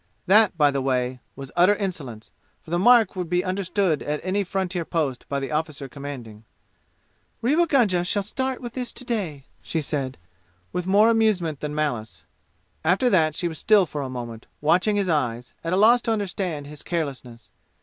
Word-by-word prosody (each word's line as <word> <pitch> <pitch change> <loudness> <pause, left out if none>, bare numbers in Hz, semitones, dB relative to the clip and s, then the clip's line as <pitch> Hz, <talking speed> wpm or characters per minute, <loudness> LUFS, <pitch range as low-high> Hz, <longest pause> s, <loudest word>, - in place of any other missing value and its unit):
That, 205 -1 +5
by 145 -2 +4
the 140 -1 -1
way, 125 -1 -1 0.2
was 135 -1 -9
utter 180 +4 +5
insolence, 145 - -5 0.3
for 160 - -13
the 175 - +1
mark 230 0 +5
would 180 -3 -4
be 180 +1 +1
understood 185 -3 0
at 150 0 -2
any 195 +2 +1
frontier 190 -2 -2
post 155 -7 -2
by 140 - -1
the 135 +1 -5
officer 150 -2 -2
commanding. 125 -5 -8 1.0
"Rewa 310 +8 +3
Gunga 215 - +3
shall 200 +3 0
start 260 +5 -2
with 240 -2 -6
this 250 -1 -3
to 255 - -11
day!" 180 - -3 0.2
she 165 - -2
said, 135 -3 -3 0.6
with 180 0 -2
more 210 +4 +5
amusement 195 -10 +1
than 150 0 -4
malice. 120 -8 -3 0.6
After 190 +10 +3
that 155 -4 +3
she 175 - -1
was 160 -2 -6
still 210 -3 +5
for 150 -3 -5
a 135 - -4
moment, 120 -3 -7
watching 180 +7 +3
his 200 -2 +1
eyes, 125 -7 -1
at 165 - -2
a 185 - +2
loss 235 +4 +6
to 230 - -1
understand 185 -7 -2
his 145 0 -8
carelessness. 135 -8 -5
170 Hz, 180 wpm, -24 LUFS, 140-200 Hz, 1.0 s, loss